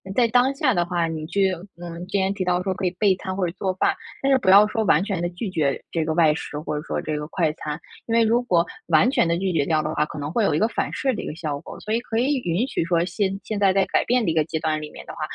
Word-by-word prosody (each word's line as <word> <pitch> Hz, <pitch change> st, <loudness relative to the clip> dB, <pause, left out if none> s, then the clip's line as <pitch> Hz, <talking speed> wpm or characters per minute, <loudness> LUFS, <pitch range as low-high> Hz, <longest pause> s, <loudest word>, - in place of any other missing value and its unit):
在 245 Hz, -2 st, +4 dB
当 250 Hz, +4 st, +3 dB
下 270 Hz, -4 st, +1 dB
的 175 Hz, 0 st, +2 dB
话， 175 Hz, -1 st, 0 dB
你 160 Hz, -1 st, -4 dB
去 190 Hz, +3 st, +1 dB, 0.3 s
嗯， 170 Hz, -1 st, -7 dB
今 195 Hz, 0 st, 0 dB
天 190 Hz, -, +1 dB
提 195 Hz, -2 st, -3 dB
到 180 Hz, 0 st, +1 dB
说 190 Hz, 0 st, -2 dB
可 185 Hz, +1 st, -3 dB
以 180 Hz, -, +1 dB
备 200 Hz, -3 st, +4 dB
餐 185 Hz, 0 st, -5 dB
或 195 Hz, -, -1 dB
者 -, -, -3 dB
做 190 Hz, -1 st, -1 dB
饭， 185 Hz, -, +1 dB, 0.3 s
但 275 Hz, -, +2 dB
是 265 Hz, -, +6 dB
不 190 Hz, -7 st, +3 dB
要 205 Hz, +2 st, +8 dB
说 220 Hz, +1 st, -1 dB
完 175 Hz, -5 st, +3 dB
全 200 Hz, -4 st, -2 dB
地 175 Hz, -, 0 dB
拒 185 Hz, +4 st, -5 dB
绝 150 Hz, -6 st, 0 dB
这 165 Hz, -2 st, -1 dB
个 160 Hz, -, 0 dB
外 160 Hz, -2 st, +4 dB
食 150 Hz, -2 st, -6 dB
或 150 Hz, -1 st, -3 dB
者 150 Hz, -, -5 dB
说 -, -, -2 dB
这 155 Hz, -1 st, -3 dB
个 150 Hz, -, -4 dB
快 165 Hz, -1 st, 0 dB
餐。 150 Hz, -1 st, -5 dB, 0.3 s
因 230 Hz, -, -3 dB
为 230 Hz, -, +5 dB
如 235 Hz, +2 st, +2 dB
果 175 Hz, -8 st, +3 dB, 0.2 s
完 165 Hz, +9 st, +4 dB
全 220 Hz, -, +2 dB
地 170 Hz, -, +1 dB
拒 190 Hz, 0 st, 0 dB
绝 155 Hz, -5 st, +1 dB
掉 155 Hz, -1 st, +2 dB
的 155 Hz, +1 st, -3 dB
话， 150 Hz, -, +2 dB
可 150 Hz, -, -8 dB
能 145 Hz, +1 st, -4 dB
会 225 Hz, +6 st, +1 dB
有 180 Hz, -, +2 dB
一 150 Hz, -, +1 dB
个 220 Hz, -, +3 dB
反 -, -, -3 dB
噬 265 Hz, -, 0 dB
的 -, -, -5 dB
一 -, -, -6 dB
个 155 Hz, -, -5 dB
效 150 Hz, -4 st, -4 dB
果。 -, -, -10 dB
所 215 Hz, -, -6 dB
以 230 Hz, -, +2 dB
可 225 Hz, -1 st, -2 dB
以 270 Hz, +3 st, +2 dB
允 200 Hz, +3 st, -1 dB
许 -, -, -1 dB
说 170 Hz, -1 st, +2 dB
先 190 Hz, +2 st, -1 dB
现 215 Hz, -, -4 dB
在 195 Hz, -2 st, +4 dB
在 195 Hz, -1 st, +3 dB
改 -, -, +1 dB
变 245 Hz, -1 st, +2 dB
的 -, -, +1 dB
一 -, -, -1 dB
个 160 Hz, -1 st, +3 dB
阶 160 Hz, 0 st, -3 dB
段 155 Hz, -1 st, -1 dB
里 150 Hz, -, -7 dB
面 -, -, -11 dB
的 -, -, -8 dB
话， -, -, -11 dB
180 Hz, 350 characters per minute, -23 LUFS, 160-210 Hz, 0.3 s, 要